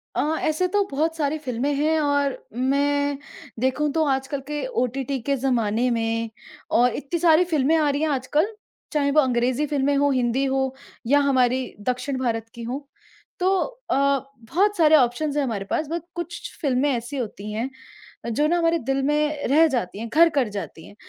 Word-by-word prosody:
अ, -, -, +2 dB, 0.2 s
ऐसे 310 Hz, +4 st, +1 dB
तो 405 Hz, +2 st, +2 dB
बहुत 320 Hz, +4 st, 0 dB
सारी 300 Hz, 0 st, 0 dB
फ़िल्में 265 Hz, +1 st, -2 dB
हैं 310 Hz, +3 st, +2 dB
और 285 Hz, -1 st, +1 dB, 0.2 s
मैं 285 Hz, +3 st, +1 dB, 0.4 s
देखूँ 265 Hz, +4 st, +1 dB
तो 320 Hz, -1 st, +2 dB
आजकल 270 Hz, 0 st, -1 dB
के 295 Hz, +8 st, -3 dB, 0.2 s
ओटीटी 265 Hz, +2 st, -2 dB
के 280 Hz, +3 st, 0 dB
ज़माने 240 Hz, -2 st, +1 dB
में 230 Hz, 0 st, -1 dB, 0.5 s
और 245 Hz, -1 st, +3 dB
इतनी 310 Hz, +4 st, -3 dB
सारी 330 Hz, 0 st, +5 dB
फ़िल्में 305 Hz, +1 st, +3 dB
आ 305 Hz, -2 st, +3 dB
रही 285 Hz, +1 st, -1 dB
हैं 315 Hz, -, +1 dB
आजकल, 290 Hz, +6 st, +1 dB, 0.5 s
चाहें 285 Hz, -2 st, +2 dB
वो 305 Hz, -, +4 dB
अंग्रेजी 255 Hz, +2 st, +1 dB
फ़िल्में 285 Hz, -1 st, +1 dB
हो, 285 Hz, +1 st, +3 dB
हिंदी 255 Hz, 0 st, +1 dB
हो 265 Hz, -1 st, 0 dB, 0.3 s
या 285 Hz, +3 st, +5 dB
हमारी 255 Hz, -1 st, +2 dB, 0.2 s
दक्षिण 255 Hz, +2 st, -1 dB
भारत 225 Hz, -3 st, -2 dB
की 235 Hz, -, -7 dB
हों। 250 Hz, +4 st, -3 dB, 0.6 s
तो 370 Hz, +1 st, +2 dB, 0.4 s
अ, -, -, +3 dB
बहुत 275 Hz, -, 0 dB
सारे 315 Hz, -2 st, +6 dB
ऑप्शंस 285 Hz, +2 st, +2 dB
हैं 290 Hz, -, +2 dB
हमारे 215 Hz, -7 st, -3 dB
पास 310 Hz, -, 0 dB
बट 340 Hz, 0 st, -2 dB
कुछ 345 Hz, 0 st, -6 dB
फ़िल्में 280 Hz, -1 st, +1 dB
ऐसी 245 Hz, +3 st, -3 dB
होती 210 Hz, -4 st, -5 dB
हैं, 225 Hz, +5 st, -2 dB, 0.6 s
जो 295 Hz, +7 st, +2 dB
ना 345 Hz, -, +2 dB
हमारे 335 Hz, 0 st, +2 dB
दिल 270 Hz, +1 st, -1 dB
में 295 Hz, +1 st, 0 dB
रह 305 Hz, +5 st, +5 dB
जाती 230 Hz, -, -2 dB
हैं 230 Hz, +1 st, -5 dB
घर 335 Hz, +2 st, +6 dB
कर 245 Hz, -, 0 dB
जाती 200 Hz, -5 st, -7 dB
हैं। -, -, -15 dB
275 Hz, 180 wpm, -23 LUFS, 250-300 Hz, 0.6 s, सारे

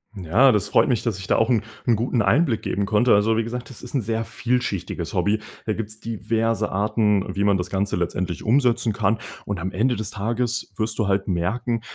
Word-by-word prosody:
Ja, 100 Hz, +9 st, +4 dB
das 105 Hz, -5 st, 0 dB
freut -, -, +4 dB
mich, 125 Hz, -4 st, +1 dB
dass 110 Hz, -6 st, -2 dB
ich 95 Hz, -, -8 dB
da -, -, +3 dB
auch 115 Hz, +2 st, +2 dB
'n 115 Hz, -3 st, +3 dB, 0.2 s
'n 120 Hz, -3 st, +4 dB
guten 115 Hz, 0 st, 0 dB
Einblick 120 Hz, -, +2 dB
geben 100 Hz, 0 st, -1 dB
konnte. 115 Hz, +3 st, +4 dB
Also, 110 Hz, +2 st, +3 dB
wie 115 Hz, -, +1 dB
gesagt, 125 Hz, +4 st, -5 dB
das 125 Hz, -, -12 dB
ist 125 Hz, -, -9 dB
'n 135 Hz, -, +1 dB
sehr 115 Hz, +1 st, -2 dB
vielschichtiges 120 Hz, -8 st, -2 dB
Hobby. 105 Hz, +1 st, +1 dB, 0.3 s
Da 110 Hz, -, +1 dB
gibt’s 110 Hz, 0 st, -5 dB
diverse 115 Hz, -1 st, -1 dB
Arten, 105 Hz, 0 st, +2 dB
wie 100 Hz, -, 0 dB
man 100 Hz, -1 st, +3 dB
das 90 Hz, 0 st, -4 dB
Ganze 100 Hz, +1 st, -1 dB
letztendlich 90 Hz, +1 st, -2 dB
umsetzen 120 Hz, -1 st, +2 dB
kann. 110 Hz, +1 st, 0 dB, 0.3 s
Und 100 Hz, -4 st, -3 dB
am 95 Hz, +3 st, -3 dB
Ende 120 Hz, +6 st, +1 dB
des 110 Hz, -2 st, -4 dB
Tages 120 Hz, +4 st, -2 dB
wirst 110 Hz, 0 st, -2 dB
du 105 Hz, -4 st, 0 dB
halt 95 Hz, 0 st, 0 dB
merken, 110 Hz, +6 st, -1 dB
110 Hz, 215 wpm, -23 LUFS, 100-115 Hz, 0.3 s, Ja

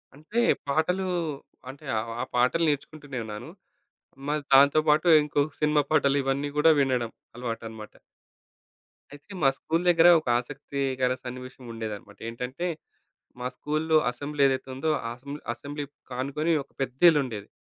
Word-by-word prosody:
అంటే 160 Hz, +11 st, -3 dB, 0.3 s
పాటలు 180 Hz, +6 st, +1 dB, 0.6 s
అంటే 140 Hz, +3 st, -11 dB
ఆహ్, 115 Hz, +1 st, -3 dB, 0.2 s
పాటలు 125 Hz, +7 st, +3 dB
నేర్చుకుంటూనే 145 Hz, -2 st, -4 dB
ఉన్నాను. 105 Hz, -1 st, -7 dB, 0.8 s
మరి 150 Hz, +1 st, 0 dB
దాంతో 140 Hz, +3 st, +7 dB
పాటు 155 Hz, +3 st, +4 dB, 0.2 s
ఇంకో 145 Hz, -1 st, 0 dB, 0.2 s
సినిమా 150 Hz, -1 st, +3 dB
పాటలు 140 Hz, -2 st, +3 dB
ఇవన్నీ 140 Hz, +2 st, -1 dB
గూడా 160 Hz, +2 st, +6 dB
వినడం 125 Hz, -4 st, 0 dB, 0.2 s
అలవాటనమాట. 115 Hz, -3 st, -6 dB, 1.2 s
అయితే 145 Hz, +8 st, -14 dB
మా 135 Hz, -, +6 dB
స్కూలు 165 Hz, +2 st, -1 dB
దగ్గర 170 Hz, 0 st, +6 dB
ఒక 155 Hz, -, -15 dB
ఆసక్తికర 135 Hz, -1 st, -2 dB
సన్నివేశం 130 Hz, +1 st, -8 dB
ఉండేదన్నమాట. 105 Hz, -2 st, -7 dB
ఏంటంటే 125 Hz, +8 st, -5 dB, 0.7 s
మా 125 Hz, -, -2 dB
స్కూలులో 155 Hz, +1 st, +1 dB
అసెంబ్లీ 145 Hz, +4 st, -4 dB
ఏదైతే 135 Hz, 0 st, -1 dB
ఉందో 155 Hz, +5 st, -1 dB, 0.2 s
అసెంబ్ 140 Hz, +5 st, -8 dB
అసెంబ్లీ 145 Hz, +4 st, -6 dB, 0.3 s
కానుకొని 140 Hz, +6 st, -1 dB
ఒక 140 Hz, -, -34 dB
పెద్దిల్లుండేది. 130 Hz, -, +2 dB
140 Hz, 125 wpm, -27 LUFS, 125-150 Hz, 1.2 s, దాంతో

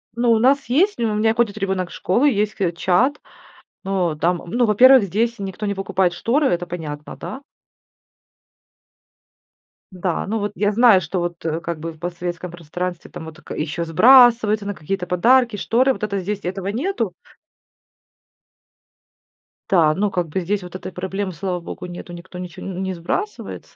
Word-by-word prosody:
Ну, 235 Hz, 0 st, +2 dB
у 225 Hz, -, +4 dB
нас 275 Hz, +4 st, +3 dB
есть 370 Hz, +11 st, +3 dB
ну, 230 Hz, -2 st, 0 dB
у -, -, -1 dB
меня 220 Hz, +1 st, +2 dB
ходит 230 Hz, -3 st, +1 dB
ребенок 190 Hz, -3 st, -2 dB
в -, -, -12 dB
школу, 230 Hz, +10 st, +1 dB
есть 215 Hz, -5 st, +1 dB
к 185 Hz, -5 st, 0 dB
чат. 210 Hz, -, +1 dB, 0.6 s
Ну, 185 Hz, -4 st, 0 dB
там 175 Hz, +2 st, 0 dB
ну, 240 Hz, +8 st, +1 dB
во-первых, 250 Hz, +3 st, +7 dB
здесь 225 Hz, +4 st, -1 dB
никто 195 Hz, +1 st, -5 dB
не 200 Hz, -, 0 dB
покупает 190 Hz, -2 st, 0 dB
шторы, 265 Hz, -, +1 dB
это 175 Hz, -4 st, 0 dB
понятно, 150 Hz, -4 st, -6 dB
да. 265 Hz, -, -7 dB, 2.5 s
Да. 180 Hz, -1 st, -2 dB
Ну, 220 Hz, +2 st, -1 dB
вот 205 Hz, -1 st, -2 dB
я 205 Hz, 0 st, +1 dB
знаю, 230 Hz, -4 st, +6 dB
что 175 Hz, +3 st, -3 dB
вот, 170 Hz, -1 st, -5 dB
э, 165 Hz, +1 st, -1 dB
как 170 Hz, -1 st, -4 dB
бы 165 Hz, +2 st, -5 dB
в 155 Hz, -, -20 dB
постсоветском 175 Hz, 0 st, -5 dB
пространстве 175 Hz, +1 st, -5 dB
там 175 Hz, -2 st, -9 dB
вот 160 Hz, -1 st, -10 dB
тк -, -, -14 dB
еще 165 Hz, +2 st, -3 dB
сбрасываются 225 Hz, +2 st, +6 dB
на 205 Hz, -, -3 dB
какие-то 180 Hz, +3 st, -4 dB
подарки, 235 Hz, +5 st, +3 dB
шторы, 250 Hz, +6 st, +2 dB
вот -, -, -10 dB
это 200 Hz, -2 st, -1 dB
здесь 200 Hz, +2 st, -4 dB
этого 190 Hz, +1 st, -4 dB
нету. 230 Hz, -, -2 dB, 2.6 s
Да. 165 Hz, -5 st, +4 dB
Ну, 200 Hz, +3 st, 0 dB
как 175 Hz, -2 st, -1 dB
бы 170 Hz, -, -2 dB
здесь 195 Hz, +2 st, -2 dB
вот 180 Hz, 0 st, -10 dB
этой 185 Hz, -, -6 dB
проблемы, 190 Hz, +1 st, -4 dB
слава 180 Hz, +1 st, -3 dB
богу, 170 Hz, -, -8 dB
нету. 175 Hz, 0 st, -9 dB
Никто 180 Hz, +1 st, -10 dB
ничего 180 Hz, 0 st, -8 dB
н 190 Hz, -1 st, -5 dB
не 190 Hz, -, -2 dB
сбрасывается. 185 Hz, -, -5 dB
190 Hz, 175 wpm, -21 LUFS, 175-225 Hz, 2.6 s, во-первых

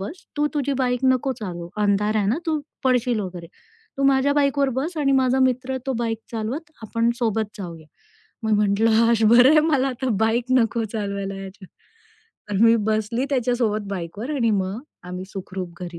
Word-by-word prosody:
बस 260 Hz, -, -7 dB
तू 295 Hz, 0 st, +2 dB
तुझी 285 Hz, -1 st, 0 dB
बाईक 250 Hz, -2 st, 0 dB
नको 260 Hz, +1 st, +2 dB
चालवू. 175 Hz, -4 st, -6 dB
अंधार 210 Hz, +1 st, +2 dB
आहे 205 Hz, -2 st, +1 dB
ना 230 Hz, +9 st, +1 dB
तू 310 Hz, -2 st, 0 dB, 0.2 s
पडशील 250 Hz, -3 st, +2 dB
वगैरे. 180 Hz, -3 st, -6 dB, 0.5 s
तू -, -, 0 dB
माझ्या 275 Hz, +1 st, +3 dB
बाईकवर 280 Hz, -1 st, +2 dB
बस 325 Hz, +5 st, -4 dB
आणि 275 Hz, -2 st, +2 dB
माझा 260 Hz, 0 st, +2 dB
मित्र 260 Hz, +1 st, 0 dB
तो 265 Hz, -, 0 dB
बाईक 225 Hz, -2 st, -1 dB
चालवत 245 Hz, +8 st, -4 dB
आपण 230 Hz, +2 st, 0 dB
सोबत 220 Hz, -3 st, -1 dB
जाऊया." 170 Hz, -5 st, -8 dB, 0.6 s
मी 220 Hz, -, +1 dB
म्हटलं, 210 Hz, +2 st, +3 dB, 0.2 s
आज 230 Hz, -1 st, +2 dB
बरं 260 Hz, +6 st, +7 dB
मला 275 Hz, -4 st, +2 dB
आता 260 Hz, 0 st, -3 dB, 0.2 s
बाईक 230 Hz, +2 st, +1 dB, 0.2 s
नको 230 Hz, 0 st, 0 dB
चालवायला 200 Hz, -2 st, -4 dB
याच्या 195 Hz, 0 st, -10 dB, 0.8 s
तर 205 Hz, +2 st, +1 dB
मी 230 Hz, 0 st, +6 dB
बसली 220 Hz, +4 st, 0 dB
त्याच्यासोबत 235 Hz, -5 st, 0 dB
बाईकवर 200 Hz, -, -4 dB
आणि 230 Hz, -4 st, +2 dB
मग 195 Hz, +1 st, -1 dB, 0.3 s
आम्ही 180 Hz, +1 st, -6 dB
सुखरूप 185 Hz, -2 st, -6 dB
घरी 175 Hz, -1 st, -7 dB
230 Hz, 170 wpm, -23 LUFS, 200-260 Hz, 0.8 s, बरं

